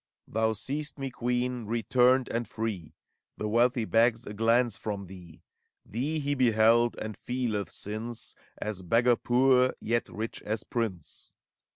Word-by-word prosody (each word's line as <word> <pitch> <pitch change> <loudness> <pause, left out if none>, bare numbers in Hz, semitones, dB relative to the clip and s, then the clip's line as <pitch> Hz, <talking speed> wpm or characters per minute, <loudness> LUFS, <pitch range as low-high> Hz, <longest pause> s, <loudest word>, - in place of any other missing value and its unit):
Thou 110 0 +1
seest 145 +8 -4
me, 135 -1 -4
Queen, 125 -1 -1
returned 125 +3 +3
and 115 -1 -2
free! 105 -8 -4 0.4
The 105 - -2
wealthy 120 +2 +2
begs 115 +2 +3
a 105 - -6
glance 115 +3 +2
from 100 -2 -4
thee: 85 -3 -13 0.4
Thee 135 +9 -2
he 145 -1 0
beheld, 120 -2 +4
and 110 -1 -5
feeleth, 120 -5 -2
since. 110 +3 -5 0.2
As 105 -3 -4
beggar 120 +7 +3
poor, 130 +1 +3
yet 115 +1 -1
rich 110 +2 -5
as 110 +1 -3
prince. 105 -9 -4
115 Hz, 140 wpm, -29 LUFS, 110-125 Hz, 0.4 s, beheld